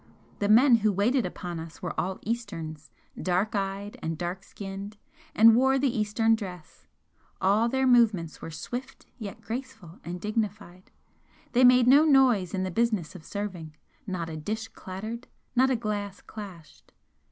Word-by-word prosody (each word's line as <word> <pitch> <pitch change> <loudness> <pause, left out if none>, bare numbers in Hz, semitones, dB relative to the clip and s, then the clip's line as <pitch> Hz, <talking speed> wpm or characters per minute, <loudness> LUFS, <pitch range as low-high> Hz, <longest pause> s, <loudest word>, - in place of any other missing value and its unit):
The 205 - 0
men 240 +3 +7
who 215 -1 +2
waited 210 +3 +2
upon 175 -1 -6
us 160 0 -10
were - - -3
all 190 +1 -2
Easterns, 165 -10 -5 0.3
dark 185 +4 0
eyed 200 0 -3
and 160 0 -3
dark 175 +2 -4
skinned, 200 +1 -8 0.4
and 225 +1 +8
wore 265 +2 +4
the 270 -2 +1
Eastern 220 +1 +2
dress, 185 -7 -6 0.5
all 205 +5 +3
their 265 +2 +1
movements 225 -10 +3
were - - -6
swift 245 - -7
yet 210 0 -7
graceful 225 -7 -7
and 175 +2 -5
dignified 210 -3 -4 0.6
they 250 +1 +4
made 250 -1 +7
no 275 +5 +7
noise 255 - +4
in 185 - -1
the 185 - -2
business 215 -6 0
of 185 - -11
serving, 180 -5 -6 0.3
not 180 -4 -3
a 160 - -6
dish 220 +8 -4
clattered, 215 +6 -7 0.3
not 260 +2 +4
a 260 - +2
glass 205 -3 -3
clashed. 190 -7 -11
205 Hz, 155 wpm, -27 LUFS, 180-235 Hz, 0.6 s, and